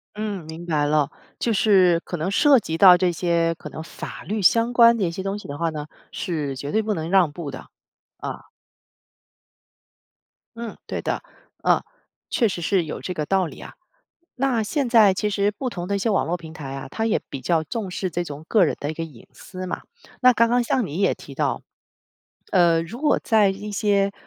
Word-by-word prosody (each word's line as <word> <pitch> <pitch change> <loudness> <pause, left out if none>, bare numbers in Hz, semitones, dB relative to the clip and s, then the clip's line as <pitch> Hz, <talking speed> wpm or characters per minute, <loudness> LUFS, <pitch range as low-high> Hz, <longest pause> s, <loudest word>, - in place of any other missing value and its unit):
嗯， 210 -5 -4
明 160 +2 -8
白 150 -3 +1
了。 150 -1 +2 0.3
就 235 - 0
是 185 -5 +4
可 175 - -5
能 165 +4 -2
涉 275 +6 +5
及 160 -5 -4
到 180 0 +9
这 180 -1 +2
些 170 0 +1
可 150 - -9
能 155 - -7
法 160 - -8
律 215 +1 -3
相 230 +5 +4
关 235 -1 +6
的 215 - -1
一 170 - 0
些 190 +2 -5
东 195 +1 -3
西 - - -11
的 145 0 -6
话 165 -1 0
呢， 150 -1 -6 0.2
是 150 -6 -3
绝 140 +2 -5
对 220 - +2
不 215 - -1
能 160 -3 -4
让 180 -6 +4
步 150 -2 -6
的， - - -9 0.5
啊。 - - -6 2.1
嗯， 230 -1 -7
对 - - -4
的。 - - -2 0.4
呃， - - +3 0.5
确 230 - +2
实 180 -3 -4
是 185 +1 +1
有 150 - -6
这 180 - -4
个 155 -3 -3
道 190 +2 +2
理 145 - -11
啊， - - -10 0.6
那 250 -4 +1
现 275 +4 -1
在 220 -5 +6
其 210 +3 -1
实 205 0 +1
不 235 +5 -4
同 175 -7 -5
的 200 - 0
一 - - -1
些 225 - 0
网 200 - +1
络 175 +2 -1
平 160 -2 -11
台 145 -5 -7
啊， 135 - -6
它 220 - -2
也 225 - +1
比 135 - -6
较 160 +5 +1
重 210 +1 -4
视 185 +1 -2
这 175 +1 -2
种 150 0 -8
个 210 -5 +5
人 155 - -1
的 145 - -2
一 160 - -5
个 165 - -4
隐 145 -8 -14
私 185 -1 -8
嘛， - - -4 0.4
那 255 -1 +7
刚 230 0 +3
刚 245 +1 +3
像 235 -2 0
你 160 +4 -5
也 - - +3
提 - - -12
到， - - -1 0.9
呃， 170 -3 +4
如 230 +10 -8
果 300 - +3
在 215 -3 +4
一 200 +2 -4
些， 200 -1 +1
185 Hz, 230 characters per minute, -23 LUFS, 165-215 Hz, 2.1 s, 到